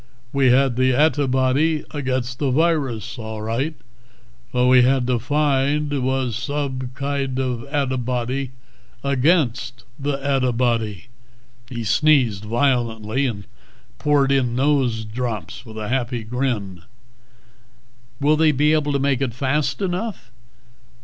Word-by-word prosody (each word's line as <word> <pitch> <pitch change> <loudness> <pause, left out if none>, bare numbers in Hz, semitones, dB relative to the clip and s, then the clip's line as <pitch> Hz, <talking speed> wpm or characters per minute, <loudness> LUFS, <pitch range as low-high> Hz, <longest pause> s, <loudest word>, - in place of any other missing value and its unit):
We 135 -2 +4
had 130 -1 +3
the 130 0 +3
adtibody 145 +1 +2
agaidst 130 -3 -2
the 140 - +1
virus, 130 - 0
all 110 -1 -6
ridght; 120 +9 -2 0.7
what 125 0 +1
we 125 0 +6
had 130 0 +3
to 125 -1 +1
find 145 +2 +1
was 130 -3 0
sobe 135 -3 -3
kide 140 -1 -2
of 130 -3 -1
adtibody 130 -2 -1 0.5
agaidst 130 -4 +1 0.2
the 140 0 -1
adtibody." 125 -7 0 0.7
He 120 -2 -4
sneezed 115 -3 +3
violently, 120 0 0
and 100 -5 -5 0.5
poured 145 -2 +2
in 125 -3 +1
nose 130 -5 +1
drops 110 -1 -5
with 110 0 -10
a 105 -1 -4
happy 120 -2 -1
grin. 110 -7 -2 1.4
"Will 145 +2 +3
they 155 0 +4
be 150 +2 +3
able 150 -2 +1
to - - +2
make 140 -1 +1
it 125 -4 -1
fast 140 +8 0
enough?" 185 - -3
130 Hz, 125 wpm, -21 LUFS, 120-140 Hz, 1.4 s, we